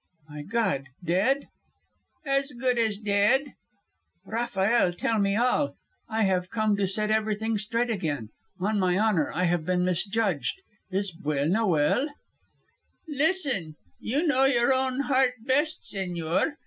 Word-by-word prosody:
"My 150 Hz, -1 st, -8 dB
God, 195 Hz, -, -1 dB, 0.2 s
dead?" 210 Hz, +12 st, +1 dB, 0.8 s
"As 275 Hz, 0 st, 0 dB
good 250 Hz, 0 st, 0 dB
as 220 Hz, -3 st, +1 dB
dead." 210 Hz, +7 st, +2 dB, 0.7 s
"Rafael, 220 Hz, -3 st, +1 dB
tell 220 Hz, +5 st, 0 dB
me 200 Hz, 0 st, +2 dB
all. 220 Hz, -, +1 dB, 0.3 s
I 220 Hz, 0 st, +1 dB
have 185 Hz, -2 st, +1 dB
come 215 Hz, -2 st, +1 dB
to 200 Hz, -1 st, +1 dB
set 210 Hz, +3 st, 0 dB
everything 220 Hz, 0 st, 0 dB
straight 230 Hz, +3 st, -1 dB
again. 145 Hz, -, -3 dB, 0.3 s
On 205 Hz, +3 st, 0 dB
my 180 Hz, -1 st, +2 dB
honour, 205 Hz, -7 st, +2 dB
I 180 Hz, -, -1 dB
have 175 Hz, -2 st, +1 dB
been 180 Hz, +1 st, +1 dB
misjudged. 195 Hz, -, -1 dB, 0.3 s
Is 195 Hz, 0 st, -1 dB
Buelna 155 Hz, +9 st, 0 dB
well?" 165 Hz, -, +2 dB, 1.0 s
"Listen. 280 Hz, -, 0 dB, 0.2 s
You 285 Hz, +9 st, -1 dB
know 270 Hz, -4 st, +3 dB
your 250 Hz, -1 st, +3 dB
own 260 Hz, 0 st, 0 dB
heart 265 Hz, -2 st, +2 dB
best, 290 Hz, +4 st, +1 dB
señor. 180 Hz, -, -1 dB
215 Hz, 135 wpm, -27 LUFS, 180-250 Hz, 1.0 s, know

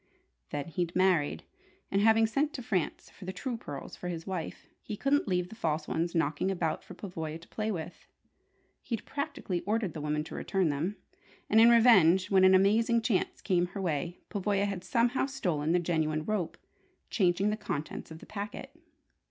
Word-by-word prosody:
Then, 145 Hz, +3 st, -4 dB
he'd 170 Hz, +1 st, -2 dB
married, 180 Hz, -, +2 dB, 0.5 s
and 195 Hz, -, +2 dB
having 225 Hz, +1 st, +5 dB
sent 280 Hz, +7 st, 0 dB
to 250 Hz, -, -6 dB
France 195 Hz, -9 st, -2 dB
for 190 Hz, -, -12 dB
the 185 Hz, -, -3 dB
true 235 Hz, +7 st, -4 dB
pearls 145 Hz, -11 st, -7 dB
for 180 Hz, -, -7 dB
his 165 Hz, -2 st, -4 dB
wife, 185 Hz, -4 st, -5 dB, 0.2 s
he 210 Hz, -, -6 dB
couldn't 280 Hz, +2 st, +1 dB
leave 180 Hz, -2 st, 0 dB
the 220 Hz, -, -10 dB
false 155 Hz, -7 st, -1 dB
ones 170 Hz, +1 st, -1 dB
knocking 160 Hz, +2 st, +1 dB
about 175 Hz, -4 st, -1 dB
for 185 Hz, -, -11 dB
Pavoya 165 Hz, -5 st, -5 dB
to 170 Hz, -, -16 dB
play 215 Hz, 0 st, -2 dB
with. 175 Hz, -2 st, -6 dB, 0.7 s
He'd 230 Hz, -4 st, -4 dB
practically 280 Hz, -, -3 dB
ordered 210 Hz, -1 st, -1 dB
the 155 Hz, -, -6 dB
woman 150 Hz, 0 st, -1 dB
to -, -, -10 dB
return 190 Hz, -4 st, 0 dB
them; 155 Hz, +8 st, -1 dB, 0.6 s
and 220 Hz, +1 st, +7 dB
in 230 Hz, -, +8 dB
revenge, 200 Hz, -6 st, +6 dB
when 190 Hz, -1 st, +5 dB
an 190 Hz, 0 st, +7 dB
amazing 225 Hz, +5 st, +3 dB
chance 210 Hz, -5 st, 0 dB
came 180 Hz, -1 st, +1 dB
her 195 Hz, -, -7 dB
way, 170 Hz, +1 st, -2 dB
Pavoya 200 Hz, 0 st, 0 dB
had 200 Hz, -3 st, -3 dB
somehow 245 Hz, +2 st, +1 dB
stolen 175 Hz, -, -1 dB
the 175 Hz, -, +4 dB
genuine 160 Hz, -3 st, 0 dB
rope, 205 Hz, -4 st, -2 dB, 0.5 s
changing 190 Hz, +1 st, +2 dB
the -, -, 0 dB
contents 205 Hz, -8 st, -5 dB
of 160 Hz, -, -9 dB
the -, -, -13 dB
packet! 205 Hz, 0 st, -7 dB
185 Hz, 185 wpm, -30 LUFS, 165-215 Hz, 0.7 s, in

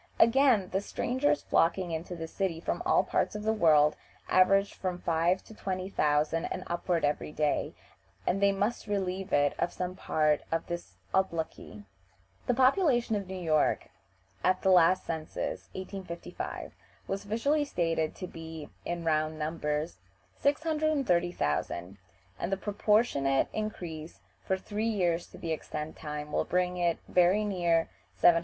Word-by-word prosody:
Again, 230 Hz, -4 st, +5 dB
the 195 Hz, -, 0 dB
strangers 260 Hz, +7 st, 0 dB
flocking 175 Hz, +1 st, +2 dB
into 165 Hz, +2 st, -4 dB
this 165 Hz, -1 st, -7 dB
city 185 Hz, -5 st, -1 dB
from -, -, -2 dB
all -, -, +4 dB
parts -, -, 0 dB
of 210 Hz, -, -4 dB
the 220 Hz, +1 st, +2 dB
world 155 Hz, -7 st, +5 dB, 0.3 s
average 195 Hz, +2 st, +4 dB
from 185 Hz, -2 st, -3 dB
five 170 Hz, +2 st, +1 dB
to -, -, -13 dB
twenty 185 Hz, -2 st, -4 dB
thousand 150 Hz, 0 st, +1 dB
and 185 Hz, -, -4 dB
upward 175 Hz, -1 st, 0 dB
every 145 Hz, +1 st, -1 dB
day, 150 Hz, -1 st, 0 dB, 0.5 s
and 195 Hz, -, +1 dB
they 200 Hz, 0 st, +5 dB
must 205 Hz, +4 st, -1 dB
relieve 190 Hz, -2 st, -2 dB
it 145 Hz, 0 st, +3 dB
of 175 Hz, -, 0 dB
some 180 Hz, 0 st, -4 dB
part 155 Hz, -4 st, +1 dB
of 165 Hz, 0 st, 0 dB
this 175 Hz, 0 st, -6 dB, 0.2 s
obloquy. 165 Hz, -, -2 dB, 0.6 s
The 245 Hz, -, +2 dB
population 255 Hz, -, +3 dB
of 200 Hz, -2 st, -3 dB
New 190 Hz, -, -6 dB
York 155 Hz, -4 st, +1 dB, 0.5 s
at 185 Hz, 0 st, +2 dB
the 190 Hz, -, +4 dB
last 180 Hz, 0 st, +5 dB
census 160 Hz, -1 st, -4 dB
(1855) 185 Hz, -2 st, -6 dB, 0.3 s
was 195 Hz, +1 st, -3 dB
officially 255 Hz, +9 st, +1 dB
stated 165 Hz, -, -1 dB
to 185 Hz, -, -6 dB
be 160 Hz, -3 st, -8 dB
(in 170 Hz, -1 st, -4 dB
round 155 Hz, 0 st, +1 dB
numbers) 150 Hz, -, -2 dB, 0.4 s
630,000, 180 Hz, -, 0 dB, 0.4 s
and 170 Hz, -, -2 dB
the 195 Hz, -, +1 dB
proportionate 205 Hz, -, +2 dB
increase 170 Hz, -7 st, -5 dB, 0.2 s
for 190 Hz, -, 0 dB
three 210 Hz, +4 st, -2 dB
years 175 Hz, -5 st, 0 dB
to -, -, -13 dB
the 165 Hz, -1 st, -2 dB
present 155 Hz, 0 st, -6 dB
time 150 Hz, -1 st, -6 dB
will -, -, +1 dB
bring 180 Hz, 0 st, 0 dB
it 170 Hz, -2 st, +1 dB
very 185 Hz, +4 st, +4 dB
near 175 Hz, -4 st, +1 dB, 0.2 s
700,000. 170 Hz, -1 st, +6 dB
180 Hz, 150 wpm, -30 LUFS, 160-200 Hz, 0.6 s, 700,000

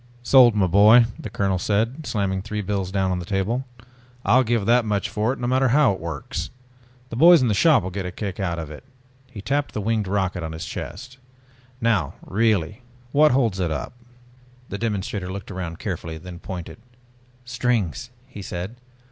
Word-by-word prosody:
"Sold, 120 Hz, -3 st, +6 dB
my 100 Hz, -3 st, +3 dB
boy!" 105 Hz, +6 st, +6 dB
the 110 Hz, -, -6 dB
colonel 95 Hz, -2 st, 0 dB
said, 115 Hz, -, -1 dB
slamming 95 Hz, -3 st, -1 dB
three 105 Hz, +1 st, -4 dB
bills 95 Hz, -1 st, -2 dB
down 95 Hz, -1 st, 0 dB
on 90 Hz, -, -1 dB
the -, -, -5 dB
table. 105 Hz, +7 st, -1 dB, 0.6 s
"I'll 125 Hz, +6 st, +5 dB
give 115 Hz, -3 st, 0 dB
that 120 Hz, +2 st, +4 dB
much 105 Hz, -2 st, -1 dB
for 110 Hz, +3 st, 0 dB
it 135 Hz, -, -4 dB
no 120 Hz, -, -4 dB
matter 130 Hz, +2 st, +2 dB
how 135 Hz, -3 st, +4 dB
it 95 Hz, -, -7 dB
works. 80 Hz, -4 st, -5 dB, 0.6 s
The -, -, -4 dB
boys 170 Hz, +6 st, +7 dB
in 120 Hz, -, +2 dB
the -, -, +2 dB
shop 150 Hz, +3 st, +4 dB
will 95 Hz, -, -4 dB
get 95 Hz, 0 st, -4 dB
a -, -, -5 dB
kick 95 Hz, 0 st, -5 dB
out 85 Hz, -3 st, -1 dB
of 80 Hz, -2 st, -6 dB
it," 75 Hz, -, -10 dB, 0.5 s
he 105 Hz, -6 st, -9 dB
tapped 145 Hz, +4 st, -1 dB
the -, -, -1 dB
winged 110 Hz, -1 st, 0 dB
rocket 95 Hz, -2 st, -1 dB
on 80 Hz, -1 st, -5 dB
his 80 Hz, -, -6 dB
chest. 125 Hz, +1 st, -7 dB, 0.6 s
"Now 110 Hz, -, +1 dB
really 105 Hz, 0 st, 0 dB, 0.3 s
what 150 Hz, +1 st, +5 dB
holds 115 Hz, -7 st, +1 dB
it 90 Hz, -2 st, 0 dB
up?" 80 Hz, +8 st, -4 dB, 0.8 s
The 100 Hz, -, -5 dB
demonstrator 100 Hz, -4 st, -3 dB
looked 100 Hz, +1 st, -7 dB
around 90 Hz, -3 st, -5 dB
carefully, 85 Hz, -5 st, -5 dB
then 85 Hz, +1 st, -10 dB
pointed. 90 Hz, +2 st, -7 dB, 0.7 s
"Strings!" 120 Hz, -, -1 dB, 0.2 s
he 125 Hz, -6 st, -10 dB
said. 95 Hz, +5 st, -6 dB
105 Hz, 190 wpm, -23 LUFS, 95-120 Hz, 0.8 s, boys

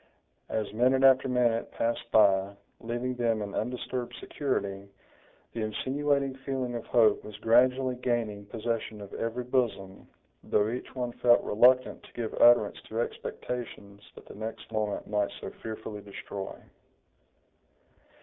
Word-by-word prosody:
As 110 Hz, -2 st, -2 dB
minute 130 Hz, +4 st, +3 dB
after 135 Hz, 0 st, +6 dB
minute 120 Hz, -3 st, +1 dB
passed 115 Hz, 0 st, -2 dB
by, 100 Hz, -2 st, +4 dB, 0.2 s
leaving 120 Hz, +2 st, -3 dB
them 115 Hz, -3 st, 0 dB
in 100 Hz, -, -6 dB
undisturbed 125 Hz, +1 st, -3 dB
security, 100 Hz, -9 st, -3 dB, 0.6 s
the 115 Hz, -, -3 dB
insinuating 140 Hz, +5 st, 0 dB
feeling 135 Hz, -2 st, -3 dB
of 120 Hz, -1 st, -5 dB
hope 110 Hz, -4 st, +4 dB
was 105 Hz, -1 st, -9 dB
gradually 130 Hz, +3 st, +3 dB
gaining 115 Hz, -5 st, -2 dB
possession 110 Hz, -1 st, -3 dB
of 100 Hz, -1 st, -10 dB
every 115 Hz, +2 st, -3 dB
bosom, 110 Hz, -7 st, -2 dB, 0.4 s
though 105 Hz, +1 st, +2 dB
each 125 Hz, +2 st, -6 dB
one 125 Hz, -2 st, -2 dB
felt 120 Hz, 0 st, +4 dB
reluctant 125 Hz, +4 st, +4 dB
to -, -, -17 dB
give 115 Hz, -2 st, -4 dB
utterance 120 Hz, -3 st, +6 dB
to 110 Hz, -, -3 dB
expectations 115 Hz, -4 st, -5 dB
that -, -, -13 dB
the -, -, -11 dB
next 110 Hz, +2 st, -7 dB
moment 105 Hz, -2 st, -2 dB
might 105 Hz, -1 st, 0 dB
so -, -, -6 dB
fearfully 110 Hz, -1 st, -6 dB
destroy. 100 Hz, -1 st, -7 dB
115 Hz, 135 wpm, -29 LUFS, 105-125 Hz, 0.6 s, after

